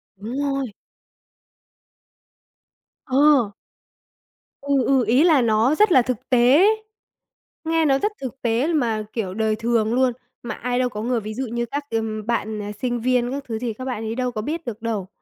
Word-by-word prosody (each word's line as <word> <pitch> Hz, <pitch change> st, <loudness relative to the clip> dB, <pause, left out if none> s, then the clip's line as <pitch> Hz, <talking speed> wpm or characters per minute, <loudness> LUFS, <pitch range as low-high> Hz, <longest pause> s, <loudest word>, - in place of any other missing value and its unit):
Đúng 215 Hz, +6 st, -7 dB
rồi! 275 Hz, -4 st, -2 dB, 2.3 s
Ờ! 275 Hz, -5 st, +4 dB, 1.1 s
Ừ, 280 Hz, -2 st, +1 dB
ừ, 265 Hz, -3 st, +3 dB
ý 250 Hz, +7 st, +4 dB
là 320 Hz, -6 st, +5 dB
nó 230 Hz, +4 st, +3 dB
rất 420 Hz, +3 st, +4 dB
là 260 Hz, -, +7 dB
thực 255 Hz, +1 st, -4 dB
tế. 255 Hz, +9 st, +5 dB, 1.0 s
Nghe 325 Hz, 0 st, +2 dB
nó 270 Hz, -2 st, +3 dB
rất 420 Hz, -, 0 dB
thực 265 Hz, 0 st, -6 dB
tế 235 Hz, +4 st, +1 dB
mà, 230 Hz, -8 st, 0 dB
kiểu, 200 Hz, -6 st, -3 dB
đời 220 Hz, +1 st, 0 dB
thường 225 Hz, 0 st, 0 dB
luôn, 255 Hz, 0 st, +2 dB, 0.3 s
mà 235 Hz, -3 st, -4 dB
ai 245 Hz, +1 st, -2 dB
đâu 255 Hz, -1 st, +1 dB
có 210 Hz, -3 st, -6 dB
người 240 Hz, +1 st, 0 dB
ví 215 Hz, 0 st, -6 dB
dụ 260 Hz, +3 st, -3 dB
như 235 Hz, +1 st, -2 dB
các 285 Hz, +5 st, -4 dB
cái, 225 Hz, -, +1 dB
ừm, 215 Hz, -1 st, -4 dB
bạn, 220 Hz, -2 st, -1 dB
ờ, 205 Hz, -, -5 dB, 0.2 s
sinh 245 Hz, -1 st, -1 dB
viên 250 Hz, 0 st, +1 dB
các 280 Hz, +1 st, -4 dB
thứ 225 Hz, -2 st, -3 dB
thì 235 Hz, -1 st, -3 dB
các 255 Hz, +4 st, -8 dB
bạn 245 Hz, -4 st, -3 dB
ấy 220 Hz, +1 st, -3 dB
đâu 250 Hz, 0 st, -1 dB
có 215 Hz, -, -4 dB
biết 315 Hz, +8 st, -4 dB
được 225 Hz, -2 st, -6 dB
đâu. 220 Hz, -5 st, -3 dB
245 Hz, 190 wpm, -22 LUFS, 220-270 Hz, 2.3 s, là